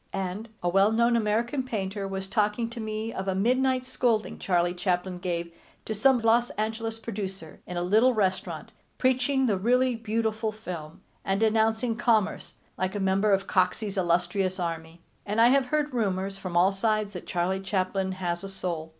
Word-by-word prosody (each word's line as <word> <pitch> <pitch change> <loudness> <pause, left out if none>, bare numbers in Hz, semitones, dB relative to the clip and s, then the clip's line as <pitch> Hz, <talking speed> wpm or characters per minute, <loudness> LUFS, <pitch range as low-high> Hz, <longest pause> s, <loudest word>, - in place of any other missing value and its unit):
And 195 +4 -4
a - - +1
well 195 +4 +4
known 235 +1 +3
American 230 +4 +1
painter 200 -5 -3
was 195 0 -4
talking 210 +3 0
to 235 - -7
me 220 +1 -4
of 190 - -4
a 190 - 0
midnight 255 +5 +2
scolding 240 -4 0
Charlie 175 -1 +1
Chaplin 180 0 -1
gave 170 -2 -3 0.3
to 220 - -2
some 255 +5 +4
Los 235 +2 +3
Angeles 225 +1 -2
producer, 195 -7 -6
in 180 - -5
a 175 - 0
little 220 +7 +4
restaurant, 190 -3 -1 0.3
preaching 260 +1 +2
the 210 -6 +2
really 250 +4 +3
beautiful 220 -1 -1
film, 175 -8 -8 0.2
and 195 0 0
denouncing 225 +1 +2
commerce 220 -4 +1 0.2
like 185 +2 -1
a - - -1
member 195 +2 +2
of 195 -1 +2
Coxey's 190 +3 0
illustrious 185 +1 0
army. 165 -1 -5 0.2
And 210 +2 -2
I 235 +1 +7
have 270 0 +3
heard 300 0 0
rumors 195 -4 -1
from 185 -3 -4
all 185 +3 +5
sides 215 +1 0
that 180 - -8
Charlie 180 +2 0
Chaplin 190 0 -1
has 175 -1 -3
a 195 - -5
soul. 170 -4 -4
205 Hz, 175 wpm, -27 LUFS, 185-225 Hz, 0.3 s, I